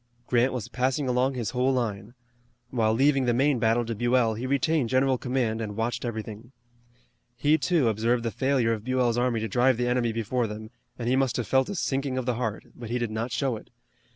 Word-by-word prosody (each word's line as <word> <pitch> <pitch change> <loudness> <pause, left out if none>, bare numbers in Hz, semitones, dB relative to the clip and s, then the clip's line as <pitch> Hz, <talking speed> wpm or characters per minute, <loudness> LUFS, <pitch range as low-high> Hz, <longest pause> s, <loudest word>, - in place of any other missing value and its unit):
Grant 125 +2 +2
was 125 -5 -4
passing 130 +3 -1
along 125 +2 +1
his 120 -4 -3
whole 130 +1 +1
line. 115 -3 -3 0.6
While 110 -3 +2
leaving 135 +1 +3
the 120 -1 +2
main 135 0 +2
battle 115 +1 +2
to 115 - -3
Buell 120 0 +2
he 120 +4 -4
retained 140 -1 +1
general 130 0 +2
command 125 -3 -1
and 105 -2 -4
watched 115 +2 -2
everything. 110 +1 -6 0.8
He, 150 +5 +3
too, 160 -4 +2
observed 115 +2 +1
the 115 - -1
failure 130 -3 +1
of 110 -2 -5
Buell's 125 -1 +1
army 120 -2 +1
to 110 - -2
drive 125 +3 +2
the 120 0 0
enemy 120 -1 +1
before 115 +2 -1
them, 110 +1 -8 0.3
and 120 - -4
he 125 - +3
must 135 -2 +1
have 120 - -2
felt 130 0 +2
a 200 - -3
sinking 135 -5 -1
of 130 - -2
the 125 - +1
heart, 115 -3 -3
but 120 -2 -8
he 120 - 0
did 120 -2 -2
not 115 +3 -3
show 130 0 0
it. - - -14
120 Hz, 215 wpm, -26 LUFS, 115-130 Hz, 0.8 s, leaving